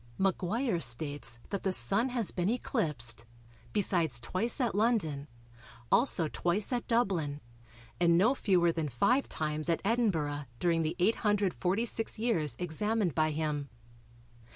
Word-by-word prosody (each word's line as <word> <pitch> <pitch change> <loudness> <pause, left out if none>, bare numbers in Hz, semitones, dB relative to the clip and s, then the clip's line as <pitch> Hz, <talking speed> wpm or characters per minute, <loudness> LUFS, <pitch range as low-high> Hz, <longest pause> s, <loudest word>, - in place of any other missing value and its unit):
Maguire 195 +3 0
states 145 -1 0
that 200 - -3
the 190 - 0
Sun 185 - +4
has 235 -7 0
been 180 +1 -1
eclipsed, 150 - -1 0.5
besides 170 - 0
twice 185 - -2
at 245 -4 0
London, 190 -10 0 0.6
also 195 - +3
twice 180 - -1
at 240 - -2
Dublin, 185 - 0 0.6
and 170 -1 +4
no 220 +9 +4
fewer 180 -9 +2
than 160 -2 -3
five 245 - +1
times 155 +1 -2
at 165 - +1
Edinburgh 165 -11 0
during 170 +1 +1
the 160 +1 -2
846 205 +2 +1
years 170 - 0
examined 185 - -1
by 155 +1 +1
him. 150 -2 -3
175 Hz, 130 wpm, -30 LUFS, 155-220 Hz, 0.6 s, Sun